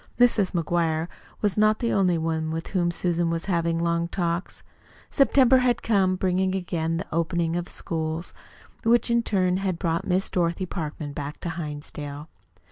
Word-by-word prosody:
Mrs. 225 -6 +4
McGuire 165 -1 0 0.3
was 210 0 +1
not 215 0 +4
the 235 - -1
only 185 -4 +3
one 160 -1 -1
with 165 +1 -4
whom 175 -3 +1
Susan 170 0 0
was 165 0 -2
having 170 -3 0
long 170 0 0
talks. 170 0 -3 0.5
September 265 -2 +5
had 250 -2 +1
come 195 -4 +2
bringing 185 0 +1
again 165 -3 -1
the 175 - -4
opening 170 0 0
of 175 0 -1
the - - -13
schools, 160 +1 -4 0.5
which 235 0 +3
in 235 0 +4
turn 185 -5 +1
had 190 -3 -1
brought 170 +1 -1
Miss 185 +1 +1
Dorothy 175 +1 0
Parkman 155 -4 -5
back 145 0 -6
to 170 - -3
Hinsdale. 150 -1 -6
175 Hz, 165 wpm, -25 LUFS, 165-190 Hz, 0.5 s, September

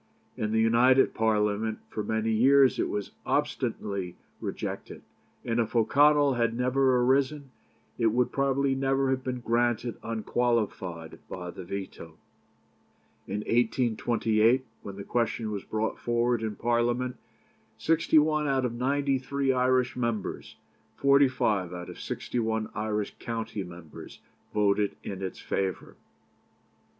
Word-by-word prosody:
In 105 0 -2
the 110 - +2
United 120 +4 +4
Parliament 110 0 +1
for 110 - -3
many 110 +1 -1
years 135 +4 +5
it - - 0
was 105 -1 -3
obstinately 95 -3 -2 0.2
rejected, - - -5 0.4
and 115 0 0
if 115 0 -1
O'Connell 145 +4 +4
had 115 -1 0
never 130 +1 +2
arisen 135 +2 +1 0.5
it 115 - +3
would 120 +3 +1
probably 140 0 +1
never 135 0 +1
have 130 0 -1
been 125 -1 -3
granted 120 0 0
unqualified 110 -7 -2
by 90 -1 -6
the - - -9
veto. 90 -4 -7 1.1
In 100 +2 -3
1828 115 +1 +2 0.2
when 100 - -8
the 100 - -7
question 115 -1 -1
was 100 -2 -4
brought 110 +1 -2
forward 120 0 +1
in 110 -2 -3
Parliament, 120 +2 0 0.6
sixty 160 0 +2
one 150 0 +3
out 135 -2 +1
of 120 - -2
ninety 135 +2 0
three 135 +1 0
Irish 130 0 +2
members, 115 -5 -3 0.4
forty 140 0 +5
five 100 -8 -1
out 90 0 -7
of - - -12
sixty 125 - -4
one 110 -1 -1
Irish 105 -1 -2
county 115 -3 -4
members, 85 -3 -11 0.3
voted 105 -1 +1
in 95 -1 -6
its 95 -1 -4
favour. 95 -2 -3
115 Hz, 130 wpm, -28 LUFS, 105-130 Hz, 1.1 s, years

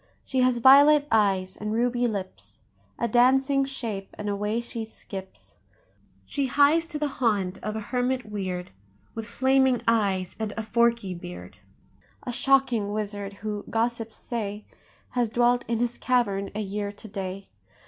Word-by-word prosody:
She 265 - -2
has 255 -1 +3
violet 285 +4 +7
eyes 195 -4 +2
and 210 +1 -4
ruby 245 +1 +1
lips, 185 - -6 0.4
A 235 - 0
dancing 265 +4 +4
shape—and 210 -6 -5
away 210 +3 -1
she 235 -1 -5
skips; 195 -3 -10 0.7
She 280 -2 -1
hies 290 +5 +4
to 310 - -5
the 300 0 0
haunt 200 -6 +1
of 215 0 -3
a - - -2
hermit 250 0 0
weird, 185 -4 -4 0.4
With 225 -1 -6
flaming 265 0 +2
eyes 200 -5 +1
and 215 -2 -3
a 225 - -2
forky 235 -3 +1
beard, 170 - -9 0.7
A 245 - -4
shocking 245 -5 +2
wizard—who, 205 0 -4
gossips 225 -1 -1
say, 210 -3 -4 0.5
Has 245 -2 0
dwelt 240 +2 +2
in 230 0 0
his 240 +1 0
cavern 200 -6 +1
a 215 - -1
year 205 0 -3
to 205 +2 -11
day. 195 -1 -6
225 Hz, 145 wpm, -26 LUFS, 200-245 Hz, 0.7 s, violet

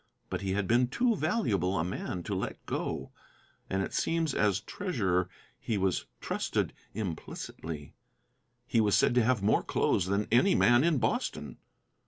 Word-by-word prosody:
But - - -2
he 95 -1 -1
had 100 -1 0
been 120 +2 +4
too 235 - +1
valuable 110 - 0
a 80 - +1
man 90 0 -4
to 100 - -3
let 95 - -4
go, - - -3 0.6
and 95 0 0
it - - -5
seems 165 -3 0
as 100 -3 +2
treasurer 95 - -1 0.3
he 110 - -2
was 95 -2 0
trusted - - -1 0.2
implicitly. 80 -5 -6 0.7
He 115 - +2
was 105 -2 +3
said - - +4
to 125 -1 +4
have 115 -3 +2
more 105 - +3
clothes 90 - +1
than 100 +2 0
any 130 - +5
man 120 +2 +5
in 165 -3 +3
Boston. - - -2
105 Hz, 160 wpm, -30 LUFS, 95-125 Hz, 0.7 s, any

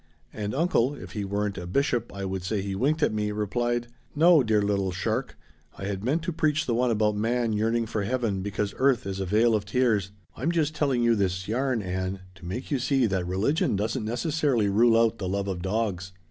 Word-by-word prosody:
And 105 +2 -4
uncle 145 -4 +2
if - - -10
he 105 -3 -3
weren't 100 0 -2
a 90 - -6
bishop 120 +3 0
I 100 0 -5
would 95 0 -3
say 100 +3 -2
he 100 -1 -3
winked 145 +10 +1
at - - +2
me 105 -1 -1
replied, 120 +3 -1 0.3
'No, 165 +1 +6
dear 110 -3 +2
little 100 -2 0
shark. 90 - -2 0.4
I - - -8
had 100 -1 -3
meant 150 +7 0
to 175 0 -2
preach 155 0 +1
the 120 - 0
one 125 +2 +2
about 105 -2 +2
man 115 +2 0
yearning 115 +2 +1
for 110 -1 -2
Heaven 105 -3 -1
because 100 +1 -2
earth 130 -5 +2
is 95 0 -4
a 95 - -2
vale 110 +4 +3
of 105 -2 +1
tears.' 105 -3 +1 0.3
I'm 155 +6 -1
just 155 -3 0
telling 135 -5 +1
you 120 0 +4
this 95 -3 -1
yarn, 125 0 0
Ann, 95 +1 -3
to 90 -2 -14
make 120 +12 -5
you 140 - +1
see 135 0 +2
that 95 -4 -1
religion 100 - +1
doesn't 110 +3 -1
necessarily 120 -1 0
rule 115 +3 +4
out 115 0 +2
the 95 -2 -3
love 100 +1 -1
of 95 -3 -3
dogs." 95 -1 -2
110 Hz, 215 wpm, -26 LUFS, 100-125 Hz, 0.4 s, No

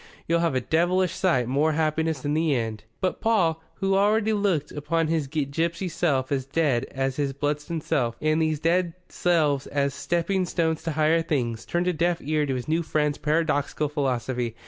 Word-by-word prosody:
You'll 170 +1 +2
have 165 -5 +1
a 130 - +1
devilish 175 +6 +1
sight 130 -11 +1
more 145 +5 +2
happiness 160 -2 0
in 145 - 0
the 155 -2 +2
end." 110 -3 -3 0.2
But 185 - -1
Paul, 180 -8 +2
who 195 0 0
already 210 +2 +3
looked 195 -8 0
upon 155 +2 -1
his 160 -3 0
gipsy 160 +5 -1
self 145 -6 0
as 135 -2 -1
dead 140 -5 +1
as 135 0 -3
his 140 -2 -1
Bludston 150 +3 -2
self, 125 -7 0
and 155 +1 +1
these 155 -2 +1
dead 170 +1 +1 0.2
selves 150 -6 +1
as 140 -1 0
stepping 175 +4 0
stones 160 -2 0
to 165 - -1
higher 155 +2 +3
things, 120 -8 -2
turned 175 +1 0
a 180 - +2
deaf 170 +1 +1
ear 150 0 0
to 135 - -1
his 125 +2 -5
new 160 +2 +1
friend's 150 -2 0
paradoxical 150 -1 0
philosophy. 125 -4 -2
155 Hz, 185 wpm, -25 LUFS, 140-170 Hz, 0.2 s, already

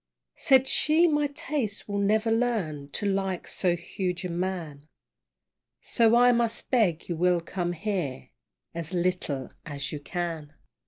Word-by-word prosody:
Said 265 -1 +4
she, 320 +3 +4
my 295 -2 +2
taste 280 -6 -3
will 200 -1 -2
never 215 +3 +2
learn 205 -12 -1
To 205 - -4
like 195 -2 -1
so 180 -2 0
huge 180 +1 -4
a 180 - -3
man, 170 -5 -4 0.9
So 230 -1 +3
I 245 +1 +6
must 235 -1 -1
beg 205 - +2
you 175 - -2
will 180 +1 +3
come 175 +1 -3
here 165 -9 -3 0.4
As 170 +1 -4
little 170 -7 -1
as 140 -3 -5
you 150 - -4
can. 160 -1 -4
185 Hz, 145 wpm, -27 LUFS, 165-225 Hz, 0.9 s, I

